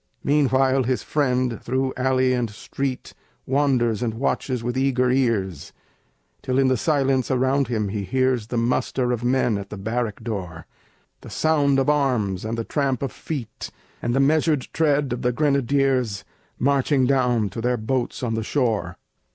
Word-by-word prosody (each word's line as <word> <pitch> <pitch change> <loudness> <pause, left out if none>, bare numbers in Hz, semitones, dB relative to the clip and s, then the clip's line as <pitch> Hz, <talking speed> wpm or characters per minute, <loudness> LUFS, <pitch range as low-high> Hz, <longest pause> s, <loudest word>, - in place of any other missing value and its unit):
Meanwhile, 135 -2 +2
his 130 0 -1
friend 125 -5 0
through 130 0 -1
alley 130 0 +2
and 120 -2 -1
street 130 +5 -5 0.3
Wanders 130 -5 +1
and 115 -3 -1
watches 125 0 -1
with 120 +1 -2
eager 130 -1 +2
ears, 110 - -1 0.7
Till 130 0 -1
in 135 -1 +4
the 130 - +3
silence 135 0 +1
around 130 +1 +1
him 110 -4 -1
he 100 0 -3
hears 130 +2 0
The 120 - -3
muster 125 +1 0
of 120 -1 -2
men 120 -4 +1
at 100 0 -8
the 105 - -7
barrack 110 +1 -3
door, 90 -7 -5 0.6
The - - -11
sound 145 -3 +2
of 135 - +1
arms, 125 -11 +1
and 115 +1 -3
the 115 - -2
tramp 140 -2 -1
of 135 - -2
feet, 135 -9 -6 0.3
And 120 +1 -1
the - - +2
measured 150 0 +2
tread 145 -4 +1
of 120 - -4
the 125 - +1
grenadiers 135 -5 +1 0.3
Marching 140 0 +2
down 125 -5 +2
to 115 - -6
their 125 +1 +1
boats 120 +3 -2
on 115 -2 -1
the 110 - -1
shore. 115 -3 -1
130 Hz, 165 wpm, -23 LUFS, 115-135 Hz, 0.7 s, in